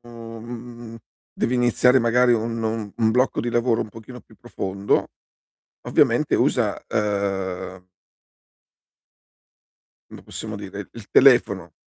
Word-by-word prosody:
mhmm, 115 0 -9 0.4
devi 125 - -1
iniziare 125 +1 +4
magari 120 +1 +3
un 115 0 -1
un 110 -2 -3
un 110 -1 +2
blocco 125 +2 +1
di 120 - -3
lavoro 120 -1 +1
un - - -9
pochino 115 +3 -11
più - - -21
profondo 100 +1 -2 0.7
ovviamente - - +2
usa, - - 0
uhm 95 -3 -2 2.2
come - - -12
possiamo 110 -1 -7
dire, 100 0 -8
il 115 -3 -12
telefono, 100 - +4
115 Hz, 110 wpm, -23 LUFS, 100-120 Hz, 2.2 s, iniziare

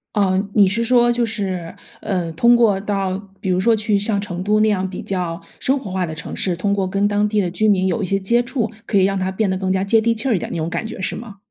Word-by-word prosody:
嗯 195 0 +1
你 200 -3 +6
是 230 +4 0
说 240 0 +4
就 240 -1 +1
是， 190 -6 -4 0.3
呃， 180 -4 -2
通 235 +9 +4
过 215 -5 +3
到 195 -2 -2 0.2
比 190 -4 -2
如 180 - +2
说 225 +4 +3
去 210 -1 +1
像 205 0 0
成 185 -3 -5
都 210 +1 +2
那 220 - +4
样 190 -2 0
比 185 - -7
较 175 -3 -3 0.2
生 270 +2 +1
活 210 -8 -8
化 185 -1 -1
的 160 - -6
城 160 - -7
市， 180 -2 0
通 200 +3 -1
过 195 -2 0
跟 200 +2 +1
当 205 0 +1
地 210 -1 +1
的 180 -3 -1
居 215 +5 0
民 190 -2 +3
有 225 - -1
一 - - -1
些 195 - +1
接 235 +5 +2
触， 235 -2 -2 0.2
可 205 - -1
以 190 - +5
让 195 0 +1
他 190 0 -1
变 200 0 0
得 190 - -1
更 190 -1 -1
加 190 0 0
接 220 +3 +3
地 230 +1 +1
气 240 +5 -1
儿 225 - +3
一 - - 0
点 - - -5
那 - - -3
种 160 +2 -2
感 220 - -3
觉 220 - -7
是 185 - -2
吗？ 220 -4 -9
200 Hz, 315 characters per minute, -20 LUFS, 185-220 Hz, 0.3 s, 你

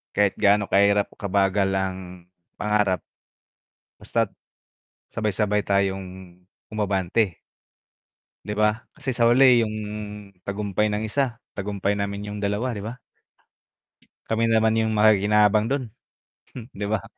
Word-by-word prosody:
kahit 100 -1 +3
gaano 105 0 +3
kahirap, 100 +1 +3
kabagal, 100 -1 +1
ang 95 -1 -1 0.6
pangarap. 105 -3 +1 1.0
Basta't, - - -1 0.8
sabay-sabay 105 -1 0
tayong 95 -2 -2 0.3
umabante 100 -2 0 1.1
'Di 105 - -3
ba, 105 - +5 0.3
kasi 145 -4 -5
sa 120 - +3
huli 120 0 +6
yung 110 - -5 0.7
tagumpay 100 +1 -1
ng 105 - -1
isa, 125 0 -1 0.2
tagumpay 100 0 -1
namin 100 0 -3
yung 105 0 -5
dalawa 105 +5 -1
'di 100 - -6
ba? 115 +3 -6 1.3
Kami 110 +1 0
naman 110 0 +3
yung 110 0 +1
makikinabang 105 0 +4
dun, 140 -1 0 0.9
'di 100 +1 -4
ba? 110 -1 -1
105 Hz, 110 wpm, -24 LUFS, 100-110 Hz, 1.3 s, huli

